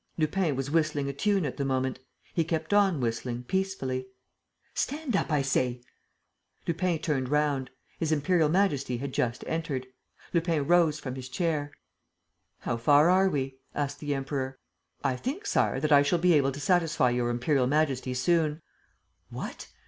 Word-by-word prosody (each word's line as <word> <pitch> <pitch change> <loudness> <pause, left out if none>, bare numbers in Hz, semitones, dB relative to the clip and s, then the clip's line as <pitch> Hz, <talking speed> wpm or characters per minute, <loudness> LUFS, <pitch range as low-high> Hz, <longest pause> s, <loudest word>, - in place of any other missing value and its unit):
Lupin 160 -1 +1
was 135 +2 -3
whistling 155 -3 +1
a - - -3
tune 195 +4 +1
at 140 - -4
the 140 - -1
moment. 130 -1 -1 0.3
He 165 - +2
kept 160 +4 -2
on 195 -6 +4
whistling, 120 0 -2
peacefully. 135 -7 -2 0.7
"Stand 290 -5 -2
up, 180 - 0
I 145 -2 +2
say!" 125 -2 0 0.8
Lupin 170 0 0
turned 135 -5 -1
round. 145 -3 +1 0.3
His 160 -2 0
Imperial 155 +1 +2
Majesty 150 -9 +1
had 135 +2 -5
just 120 0 -1
entered. 155 -6 -2 0.5
Lupin 165 -4 +1
rose 165 -2 +3
from 130 - -5
his 130 -1 -7
chair. 145 0 -1 0.9
"How 120 - -2
far 145 +7 +5
are 190 +1 +4
we?" 135 -4 -3 0.2
asked 145 0 -2
the 145 -1 -2
Emperor. 135 -1 -3 0.5
"I 130 - +1
think, 285 - -4
Sire, 135 - +1
that 155 +2 -1
I 145 -1 +8
shall 145 +5 +2
be 175 +1 +4
able 140 -3 +3
to 140 - -7
satisfy 155 -4 +2
Your 120 0 0
Imperial 125 +2 +1
Majesty 135 -3 0
soon." 155 +3 +1 0.7
"What? - - -7
145 Hz, 160 wpm, -28 LUFS, 130-165 Hz, 0.9 s, I